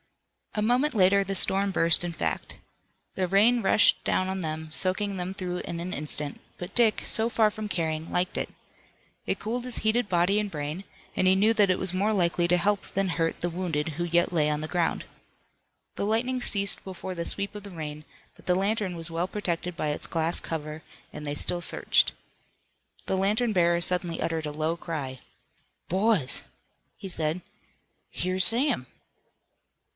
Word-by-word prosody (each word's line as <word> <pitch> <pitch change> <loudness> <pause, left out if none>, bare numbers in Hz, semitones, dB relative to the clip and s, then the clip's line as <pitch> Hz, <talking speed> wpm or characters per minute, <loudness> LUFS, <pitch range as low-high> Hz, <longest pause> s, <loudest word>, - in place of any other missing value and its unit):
A 210 - 0
moment 250 +6 +2
later 200 0 +4
the 195 0 -4
storm 195 +1 +4
burst 165 -2 +4
in 175 - -2
fact. 160 - -3 0.5
The 185 -1 -1
rain 220 +6 +4
rushed 205 +1 +4
down 185 - +1
on 190 0 -3
them, 160 -1 -4
soaking 195 +4 0
them 185 0 -4
through 180 -2 -4
in 170 -1 -5
an 180 +2 -4
instant, 150 -1 -3 0.2
but 180 +2 -7
Dick, 230 -3 +3
so 225 +1 +1
far 220 -2 +3
from 215 0 -6
caring, 160 -3 -2
liked 180 +1 0
it. - - -2 0.8
It - - -1
cooled 240 +3 -3
his 250 -1 -2
heated 220 0 +1
body 180 +3 +3
and 205 -2 -4
brain, 150 +4 -4 0.3
and - - +1
he 190 - +5
knew 210 +4 +4
that 210 -3 +3
it 185 - +2
was 185 -1 0
more 200 +4 +1
likely 175 -2 +1
to 180 - +4
help 200 +3 +1
than 195 -1 -1
hurt 165 -1 -1
the 175 - 0
wounded 165 -3 -2
who 160 +3 -4
yet 175 +1 +1
lay 150 -3 +2
on 150 0 0
the 155 - -4
ground. 175 0 -1 0.9
The - - -2
lightning 245 +4 0
ceased 200 -4 0
before 185 -1 -6
the 170 - -3
sweep 200 +4 -1
of 205 - -7
the 200 - -9
rain, 155 -3 -6 0.3
but - - -20
the 180 - +3
lantern 195 -1 -1
was 165 0 -6
well 170 +2 -1
protected 180 -4 -3
by 155 - -1
its 150 - -3
glass 165 +1 +1
cover, 155 -1 -5 0.3
and 150 - -7
they 145 0 -2
still 175 +4 +1
searched. - - +2 0.9
The - - 0
lantern 210 +5 +1
bearer 170 -2 +3
suddenly 175 -1 0
uttered 160 -2 -2
a - - -3
low 155 +2 -1
cry. 140 -7 -5 0.7
"Boys!" 190 - +2 0.6
he 195 - -7
said, 165 -1 -1 0.7
"Here's 185 +1 -1
Sam!" 235 - +4
180 Hz, 180 wpm, -27 LUFS, 165-200 Hz, 0.9 s, he